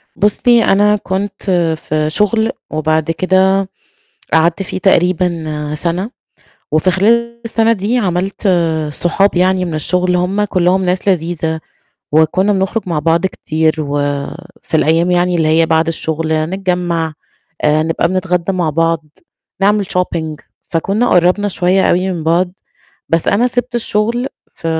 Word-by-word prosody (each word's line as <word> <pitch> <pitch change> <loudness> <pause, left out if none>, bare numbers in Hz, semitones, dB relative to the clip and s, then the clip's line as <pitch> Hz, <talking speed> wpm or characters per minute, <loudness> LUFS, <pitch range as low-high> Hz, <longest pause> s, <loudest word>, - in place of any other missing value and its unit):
بُصي، 230 +3 +3
أنا 205 +2 +3
كنت 195 0 -4 0.4
في 155 0 0
شغل 215 +5 +1 0.2
وبعد 155 +1 0
كده، 190 +2 +2 0.6
قعدت 165 +4 +2
فيه 185 - -5
تقريبًا 170 -5 0
سَنة، 175 +7 -2 0.6
وفي 155 +4 +3
خلال 235 +5 +1
السَنة 225 0 +2
دي 220 +4 0
عمَلت 190 0 -1 0.4
صحاب 180 +5 +1
يعني 185 +1 +2
من 170 -3 -4
الشغل، 180 +4 +1
هُم 190 +4 0
كُلّهم 185 0 +1
ناس 180 +2 -1
لذيذة، 165 -3 -1 0.5
وكُنّا 175 +6 +3
بنخرُج 195 +3 -1
مع 165 -3 -1
بعض 165 +4 +1
كتير 160 -3 -1
و 145 -1 -2 0.6
في - - -1
الأيام 165 +3 +2
يعني 180 0 +2
اللي 160 -1 +1
هي 160 +1 +3
بعد 160 +1 +2
الشغل، 160 -1 -2 0.2
نتجمّع، 175 -4 -1 0.5
آآ 150 +1 +3
نبقى 165 +1 0
بنتغدّى 185 0 -1
مع 175 -4 0
بعض، 165 +1 0 0.6
نعمل 205 0 +3
shopping 170 -4 -2 0.3
فكُنّا 195 +8 0
قرّبنا 180 +4 +3
شوية 185 +1 +1
أوي 185 +2 +1
من 165 -3 -5
بعض، 175 +2 +1 0.6
بس 165 0 +1
أنا 230 +5 +3
سِبت 245 0 -2
الشغل 235 +2 0 0.2
ف - - -9
180 Hz, 135 wpm, -15 LUFS, 165-195 Hz, 0.6 s, بُصي